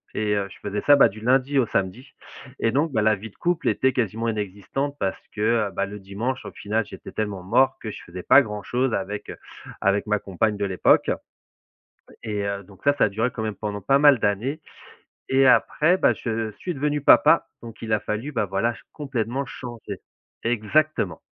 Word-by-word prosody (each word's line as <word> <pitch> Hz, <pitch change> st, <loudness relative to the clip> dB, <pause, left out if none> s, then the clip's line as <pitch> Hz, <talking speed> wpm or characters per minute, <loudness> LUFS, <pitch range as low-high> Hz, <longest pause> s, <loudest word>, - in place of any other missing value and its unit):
et, 105 Hz, -1 st, 0 dB
heu, 100 Hz, -1 st, -1 dB
je -, -, -13 dB
faisais 105 Hz, 0 st, -3 dB
ça, 145 Hz, -, +6 dB
bah, 140 Hz, -, +6 dB
du 110 Hz, +2 st, -11 dB
lundi 130 Hz, +3 st, +2 dB
au 125 Hz, -, +3 dB
samedi 100 Hz, +8 st, -3 dB, 0.5 s
et 115 Hz, -, +1 dB
donc, 145 Hz, +5 st, +1 dB
bah, 110 Hz, -, +2 dB
la 110 Hz, 0 st, +4 dB
vie 105 Hz, +3 st, -9 dB
de -, -, -25 dB
couple 175 Hz, -1 st, 0 dB
était 130 Hz, 0 st, +1 dB
quasiment 115 Hz, -1 st, -1 dB
inexistante 105 Hz, +7 st, -3 dB
parce 95 Hz, -, -2 dB
que, 110 Hz, 0 st, +1 dB
bah, 100 Hz, -, -1 dB
le 105 Hz, +1 st, -8 dB
dimanche, 110 Hz, +7 st, -4 dB
au -, -, -7 dB
final, 105 Hz, +2 st, -2 dB
j'étais -, -, -10 dB
tellement 105 Hz, -4 st, -3 dB
mort 130 Hz, +8 st, +3 dB
que 110 Hz, -, -5 dB
je -, -, -9 dB
faisais 90 Hz, +1 st, -9 dB
pas 140 Hz, -, +7 dB
grand-chose 120 Hz, +2 st, -2 dB
avec, 100 Hz, +2 st, -4 dB
heu, -, -, -9 dB, 0.4 s
avec 100 Hz, +2 st, +1 dB
ma 105 Hz, 0 st, +2 dB
compagne 105 Hz, +3 st, -1 dB
de 100 Hz, -, -1 dB
l'époque. 95 Hz, -2 st, +3 dB, 1.1 s
Et, 105 Hz, -2 st, -2 dB
heu, 100 Hz, 0 st, -3 dB
donc 95 Hz, 0 st, -18 dB
ça, 145 Hz, 0 st, +4 dB
ça -, -, +5 dB
a 110 Hz, -, +3 dB
duré 115 Hz, +5 st, 0 dB
quand 110 Hz, -, -5 dB
même 110 Hz, -, -2 dB
pendant 105 Hz, -1 st, -5 dB
pas 135 Hz, +8 st, +3 dB
mal 145 Hz, -3 st, +7 dB
d'années. 115 Hz, +10 st, -1 dB, 0.7 s
Et 135 Hz, 0 st, +4 dB
après, 160 Hz, +7 st, +4 dB
bah, -, -, +4 dB
je 110 Hz, -2 st, -3 dB
suis 180 Hz, -, -4 dB
devenu 150 Hz, +1 st, -1 dB
papa, -, -, +6 dB
donc 115 Hz, -1 st, -11 dB
il 115 Hz, -1 st, -3 dB
a 110 Hz, -, +4 dB
fallu, 110 Hz, +9 st, -3 dB
bah, 115 Hz, -5 st, 0 dB
voilà, 100 Hz, +5 st, 0 dB
ch -, -, -15 dB
complètement 135 Hz, -2 st, -3 dB
changer. 120 Hz, -2 st, -8 dB, 0.4 s
Exactement. 115 Hz, -, +1 dB
110 Hz, 200 wpm, -24 LUFS, 100-130 Hz, 1.1 s, pas